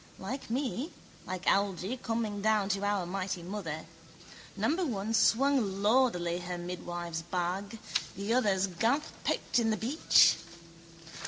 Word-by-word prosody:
Like 250 +8 -6
me, 265 +4 -1 0.4
like 185 -1 -4
Algy, 195 +2 +1
coming 225 -4 -2
down 215 -2 +2
to 200 0 0
our 205 -3 +1
mighty 185 -1 -3
mother. 170 -5 -5 0.7
Number 300 - +1
one 220 - -2
swung 225 -5 +3
lourdily 205 -7 +3
her 175 0 -5
midwife's 175 -1 -5
bag, 180 +5 -3 0.4
the 200 +3 -1
other's 200 -6 +3
gamp 225 - +1 0.2
poked - - +1
in 225 -1 +2
the 215 - +1
beach. 255 +10 +5
200 Hz, 130 wpm, -31 LUFS, 180-230 Hz, 0.7 s, beach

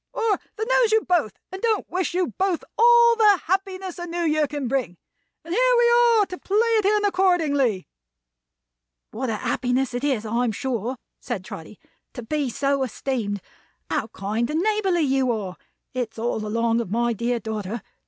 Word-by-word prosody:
Or 445 -4 +1 0.2
that 440 +1 -3
knows - - +3
you 440 0 +4
both 330 - +1
and 380 +1 -7
don't 450 -3 0
wish 365 0 -2
you 365 -1 0
both 375 -3 0
all 470 0 +6
the 415 -4 +5
happiness 380 0 -2
the 350 0 -6
New 345 0 -3
Year 305 -2 +2
can 290 -3 -4
bring. 245 -9 -2 0.5
And 335 - -4
here - - +4
we 475 0 +4 0.3
are, 415 - +4
to 365 -1 -8
play 400 - -1
it 450 -2 +3
in 415 +1 +3
accordingly." 315 - +1 1.2
"What 255 +3 -3
a 220 - -1
happiness 250 +3 -1
it 245 +2 -3
is, 260 -7 0
I'm 230 +1 0
sure," 250 +1 -3 0.2
said - - -5
Trotty, - - -9 0.4
"to 245 - -7
be 290 +3 -1
so 275 +3 0
esteemed. 230 -5 -2 0.5
How - - 0
kind 215 +3 -3
and 310 +2 0
neighborly 395 -4 +1
you 270 -3 +2
are! 200 -5 -4 0.4
It's 245 -3 -4
all 225 -1 -2
along 230 +1 +1
of 225 - -6
my 235 +3 +1
dear 235 +2 -1
daughter. 220 0 -5
280 Hz, 175 wpm, -23 LUFS, 235-385 Hz, 1.2 s, all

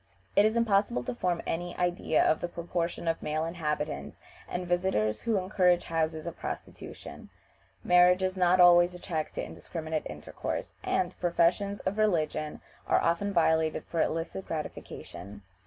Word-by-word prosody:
It 205 - +6
is 220 +1 +2
impossible 205 - +2
to 125 - -3
form 175 +7 -1
any 175 +1 -3
idea 175 -2 +1
of 155 - +2
the - - -1
proportion 170 0 -3
of 165 0 0
male 155 +1 -1
inhabitants 155 -3 -3 0.3
and 180 0 -3
visitors 175 - 0
who 230 -3 +1
encourage 185 -2 +2
houses 160 -1 -1
of - - -6
prostitution. - - -8 0.5
Marriage 180 +1 +5
is 185 0 0
not 180 0 +3
always 175 0 +7
a - - -9
check 160 -4 -3
to - - -3
indiscriminate 160 -2 -5
intercourse, - - -5
and 180 0 0
professions 180 +3 +1
of 195 +3 -2
religion 155 -7 0 0.3
are - - +4
often 170 +5 +1
violated 160 -3 +2
for 165 - -1
illicit 165 +4 -2
gratification. 105 -9 -7
175 Hz, 150 wpm, -29 LUFS, 160-185 Hz, 0.5 s, always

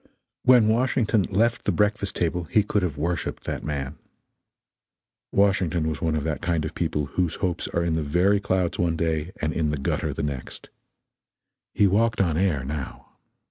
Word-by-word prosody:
When 125 -4 +6
Washington 115 -1 +2
left 115 +4 +1
the - - +2
breakfast 105 -1 0
table 85 0 -1
he 105 +6 +2
could 105 0 0
have 85 -5 -2
worshiped 85 +2 -2
that - - -4
man. 70 -1 -4 1.3
Washington 95 -5 +2
was 80 +1 -3
one 80 -3 +1
of 75 - -1
that 80 -1 -2
kind 85 -2 0
of 80 - -5
people 75 -3 -1
whose 85 +3 -1
hopes 90 -3 -2
are 85 - -1
in 85 -1 0
the 80 - 0
very 90 +7 +2
clouds 95 -3 -1
one 85 -1 +1
day 80 0 -1
and 75 0 0
in 80 -2 0
the 75 - -1
gutter 70 - -1
the - - -4
next. 70 -3 -6 1.1
He 105 - +4
walked 110 +4 +2
on 85 -5 +2
air 85 -6 +1
now. 70 -1 -6
85 Hz, 180 wpm, -25 LUFS, 75-100 Hz, 1.3 s, When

